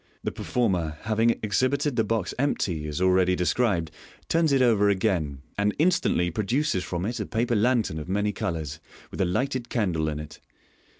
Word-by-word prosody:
— -, -, -38 dB
The -, -, -1 dB
performer, 90 Hz, -10 st, -1 dB
having 110 Hz, +1 st, +2 dB
exhibited 130 Hz, +6 st, +1 dB
the 115 Hz, -, +2 dB
box 110 Hz, -3 st, -1 dB
empty, 90 Hz, -, 0 dB
as 75 Hz, +1 st, -4 dB
already 90 Hz, 0 st, +3 dB
described, 90 Hz, -2 st, +1 dB, 0.4 s
turns 165 Hz, -2 st, +2 dB
it 135 Hz, -, +4 dB
over 105 Hz, -4 st, +4 dB
again, 90 Hz, -9 st, 0 dB, 0.2 s
and 105 Hz, 0 st, +1 dB
instantly 155 Hz, -, +2 dB
produces 110 Hz, -, 0 dB
from 90 Hz, 0 st, -3 dB
it 120 Hz, +3 st, -3 dB
a -, -, -2 dB
paper 120 Hz, +1 st, 0 dB
lantern 110 Hz, -7 st, +1 dB
of 75 Hz, -, -8 dB
many 105 Hz, +2 st, +1 dB
colours, 80 Hz, -8 st, -4 dB, 0.3 s
with -, -, -4 dB
a -, -, +3 dB
lighted 130 Hz, +7 st, -1 dB
candle 85 Hz, -9 st, 0 dB
in 75 Hz, -1 st, -4 dB
it. 75 Hz, -, -9 dB
100 Hz, 175 wpm, -26 LUFS, 85-120 Hz, 0.4 s, it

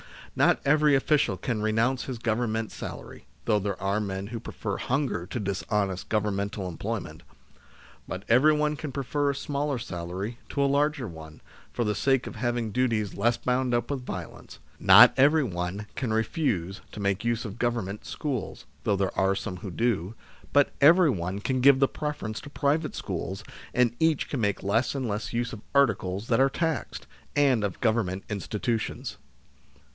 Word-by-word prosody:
Not -, -, +4 dB
every 150 Hz, 0 st, +5 dB
official 135 Hz, -6 st, +2 dB
can 110 Hz, +4 st, -2 dB
renounce 115 Hz, +4 st, +1 dB
his 130 Hz, -3 st, -4 dB
Government 115 Hz, -1 st, -1 dB
salary -, -, -8 dB, 0.2 s
(though 105 Hz, -2 st, +3 dB
there 100 Hz, -1 st, -3 dB
are 100 Hz, +2 st, 0 dB
men 100 Hz, -1 st, -3 dB
who 115 Hz, +1 st, -5 dB
prefer 105 Hz, -2 st, -4 dB
hunger 130 Hz, -10 st, -1 dB
to 120 Hz, -, -4 dB
dishonest 100 Hz, -1 st, -2 dB
Governmental 100 Hz, -2 st, -1 dB
employment), 90 Hz, -2 st, -5 dB, 0.9 s
but 95 Hz, +1 st, -5 dB
everyone 150 Hz, +5 st, +4 dB
can 150 Hz, -2 st, -5 dB
prefer 140 Hz, +2 st, -1 dB
a 140 Hz, -, -1 dB
smaller 140 Hz, 0 st, -2 dB
salary 95 Hz, +2 st, -5 dB
to 140 Hz, -, 0 dB
a -, -, +3 dB
larger 145 Hz, -2 st, +1 dB
one, 80 Hz, -3 st, -11 dB, 0.3 s
for 120 Hz, -, -1 dB
the 105 Hz, -2 st, 0 dB
sake 135 Hz, +4 st, +2 dB
of -, -, -7 dB
having 120 Hz, -3 st, -1 dB
duties 115 Hz, -4 st, 0 dB
less 120 Hz, +3 st, +1 dB
bound 125 Hz, -1 st, 0 dB
up 120 Hz, -, -1 dB
with 130 Hz, -3 st, -3 dB
violence; 90 Hz, -7 st, -7 dB, 0.2 s
not 105 Hz, +6 st, +9 dB
every 150 Hz, +3 st, +5 dB
one 90 Hz, -1 st, -3 dB
can 125 Hz, -4 st, -2 dB
refuse 110 Hz, -, -1 dB
to -, -, -7 dB
make 100 Hz, +2 st, 0 dB
use 120 Hz, 0 st, 0 dB
of 105 Hz, +1 st, -7 dB
Government 115 Hz, -5 st, -1 dB
schools 130 Hz, -10 st, -4 dB
l -, -, -32 dB
(though 105 Hz, -, +3 dB
there 95 Hz, -1 st, -1 dB
are 95 Hz, 0 st, +3 dB
some 90 Hz, -1 st, -4 dB
who 95 Hz, +2 st, -7 dB
do), 110 Hz, -1 st, -1 dB, 0.4 s
but 145 Hz, -1 st, +4 dB
everyone 140 Hz, -, +4 dB
can 130 Hz, +4 st, -1 dB
give 135 Hz, 0 st, +7 dB
the 135 Hz, -, +4 dB
preference 150 Hz, -8 st, -4 dB
to -, -, -10 dB
private 150 Hz, +2 st, 0 dB
schools, 95 Hz, +2 st, -4 dB, 0.3 s
and 120 Hz, -1 st, +2 dB
each 160 Hz, -3 st, +2 dB
can 135 Hz, -, -2 dB
make 100 Hz, -3 st, 0 dB
less 115 Hz, +7 st, +1 dB
and 130 Hz, -3 st, -2 dB
less 105 Hz, +2 st, -3 dB
use 120 Hz, 0 st, -1 dB
of 105 Hz, -, -7 dB
articles 105 Hz, -6 st, +2 dB
that 115 Hz, -, +3 dB
are 135 Hz, +1 st, +5 dB
taxed, 160 Hz, +1 st, -2 dB, 0.3 s
and 135 Hz, -6 st, +3 dB
of 100 Hz, -3 st, -3 dB
Government 110 Hz, -5 st, +1 dB
institutions. 110 Hz, +2 st, -3 dB
115 Hz, 170 wpm, -27 LUFS, 100-135 Hz, 0.9 s, not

